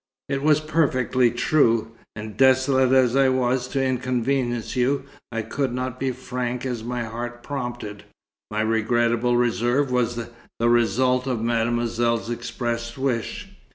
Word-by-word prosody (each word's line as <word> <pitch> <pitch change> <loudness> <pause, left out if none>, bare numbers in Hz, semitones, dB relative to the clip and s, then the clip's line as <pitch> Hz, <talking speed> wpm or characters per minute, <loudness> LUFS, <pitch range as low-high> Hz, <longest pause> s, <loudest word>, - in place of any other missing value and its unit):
It 135 0 -1
was 150 0 +4
perfectly 130 -5 +2
true. 115 -2 +2 0.2
And 105 0 -7
desolated 130 0 +4
as 130 -1 +4
I 135 -1 +4
was 130 -1 +1
to 135 0 -1
inconvenience 125 -1 -1
you, 130 +3 +1 0.3
I 115 -2 -2
could 130 +3 -2
not 130 0 -4
be 135 - -1
as 130 - -1
frank 125 -1 -4
as 120 -4 -3
my 120 0 -3
heart 120 +2 -6
prompted. 120 -7 -5 0.4
My 110 0 -1
regrettable 115 +2 +1
reserve 120 +3 +1
was 120 -1 +1 0.4
the 115 +1 +2
result 125 +2 +2
of 120 -4 -1
Mademoiselle's 115 -1 0
expressed 120 0 -4
wish. 130 -4 -2
120 Hz, 140 wpm, -23 LUFS, 115-130 Hz, 0.4 s, was